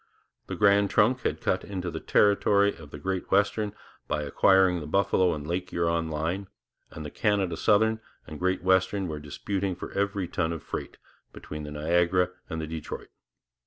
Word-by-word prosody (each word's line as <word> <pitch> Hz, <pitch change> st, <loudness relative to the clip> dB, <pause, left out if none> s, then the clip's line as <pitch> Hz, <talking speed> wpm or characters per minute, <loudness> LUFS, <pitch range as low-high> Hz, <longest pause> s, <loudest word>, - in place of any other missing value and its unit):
The -, -, -4 dB
Grand 100 Hz, -1 st, +4 dB
Trunk 125 Hz, +5 st, +3 dB
had -, -, -2 dB
cut -, -, 0 dB
into 90 Hz, -3 st, -4 dB
the 80 Hz, -, -5 dB
territory 100 Hz, +1 st, +3 dB
of 80 Hz, -3 st, -12 dB
the 75 Hz, -, -8 dB
Great 95 Hz, +4 st, -3 dB
Western 105 Hz, +1 st, +2 dB, 0.4 s
by 75 Hz, -, -1 dB
acquiring 90 Hz, +5 st, +4 dB
the 75 Hz, -, -7 dB
Buffalo 95 Hz, 0 st, +2 dB
and 75 Hz, -1 st, -7 dB
Lake 90 Hz, +3 st, -3 dB
Huron 85 Hz, -2 st, 0 dB
line, 85 Hz, +6 st, -2 dB, 0.4 s
and 80 Hz, -, -8 dB
the 75 Hz, -, -6 dB
Canada 100 Hz, -5 st, 0 dB
Southern 110 Hz, +4 st, +3 dB, 0.3 s
and 75 Hz, -, -8 dB
the -, -, -14 dB
Great 95 Hz, 0 st, 0 dB
Western 95 Hz, +1 st, +2 dB
were 75 Hz, -2 st, -4 dB
disputing 95 Hz, +6 st, -3 dB
for -, -, -8 dB
every 100 Hz, -2 st, -1 dB
ton 85 Hz, -1 st, -1 dB
of 80 Hz, -, -7 dB
freight -, -, -6 dB, 0.4 s
between 75 Hz, 0 st, -8 dB
the 75 Hz, 0 st, -7 dB
Niagara 85 Hz, +4 st, +2 dB, 0.2 s
and 80 Hz, -2 st, -4 dB
the 80 Hz, -, -3 dB
Detroit. 80 Hz, -1 st, -7 dB
90 Hz, 180 wpm, -27 LUFS, 80-100 Hz, 0.4 s, Grand